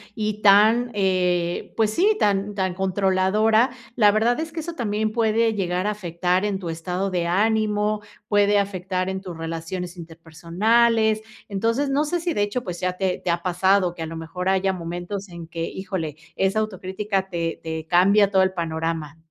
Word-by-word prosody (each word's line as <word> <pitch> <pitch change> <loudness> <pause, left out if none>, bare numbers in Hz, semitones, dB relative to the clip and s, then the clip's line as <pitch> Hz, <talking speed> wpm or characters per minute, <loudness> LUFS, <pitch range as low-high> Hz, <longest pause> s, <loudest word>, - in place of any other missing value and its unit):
y 215 -1 -3
tan 215 +4 +5
eh, 180 -3 0
pues 220 -1 +2
sí, 400 - +3
tan 200 0 +1
tan 190 -2 -1
controladora, 195 +5 +2 0.3
la 210 -3 +6
verdad 225 +5 +2
es 320 0 -4
que 330 - -3
eso 340 +2 -6
también 215 -6 -1
puede 225 0 +2
llegar 185 -1 -1
a - - +1
afectar 180 -1 -1
en 205 -2 -1
tu 180 -3 -6
estado 180 +4 -3
de 175 -2 -1
ánimo, 210 +2 +1 0.3
puede 205 0 +4
afectar 185 -1 -2
en 190 0 -3
tus 180 -4 -8
relaciones 165 +2 -5
interpersonales, 205 +8 +1 0.3
entonces, 230 +8 0
no 285 +2 +1
sé 345 +4 -1
si 340 0 -1
de 205 - +1
hecho, 225 +4 -2
pues 180 -4 -6
ya 185 -1 -1
te 185 0 -1
te - - -2
ha 170 0 0
pasado 185 0 +2
que 175 - -9
a - - -3
lo 165 +1 -7
mejor 165 +3 -5
haya 190 0 +2
momentos 175 +3 -5
en 170 -1 -9
que 165 0 -4
híjole, 185 -6 -4 0.2
esa 195 +3 +1
autocrítica 195 -1 -2
te 170 -2 -3
te 160 -1 -5
cambia 200 +4 +4
todo 190 - +4
el 190 0 0
panorama. 165 -3 -3
190 Hz, 180 wpm, -23 LUFS, 175-215 Hz, 0.3 s, la